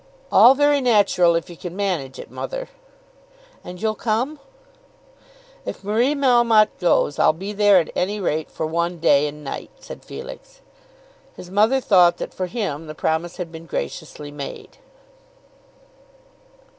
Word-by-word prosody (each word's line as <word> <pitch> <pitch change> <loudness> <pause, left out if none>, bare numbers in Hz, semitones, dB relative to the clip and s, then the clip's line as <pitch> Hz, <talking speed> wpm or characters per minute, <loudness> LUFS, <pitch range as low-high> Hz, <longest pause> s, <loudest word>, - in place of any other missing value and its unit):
"All 255 +3 +7
very 290 0 +3
natural 200 -8 +3
if 165 - -2
you 175 - -10
can 175 +1 -8
manage 175 -10 -2
it, - - -10
mother." - - -6 0.9
"And 180 0 -9
you'll 220 +1 0
come?" 240 +8 -2 1.2
"If - - -7
Marie 235 +8 +1
Melmotte 240 -6 +4
goes, 170 -4 +1
I'll - - +5
be 195 +4 -5
there 205 -1 +5
at 170 - +1
any 205 +3 -1
rate 160 -4 -2
for 160 - -4
one 170 +2 -2
day 150 -3 +3
and 150 +1 -9
night," 135 - -6
said - - -11
Felix. - - -10 0.7
His 180 - -11
mother 220 +7 +3
thought 180 -7 +4
that, - - -6
for 185 - -3
him, 170 -7 -4
the 155 - -8
promise 160 +3 -2
had 175 -3 -6
been 165 0 -11
graciously 145 - -6
made. 145 -1 -9
185 Hz, 145 wpm, -21 LUFS, 165-225 Hz, 1.2 s, All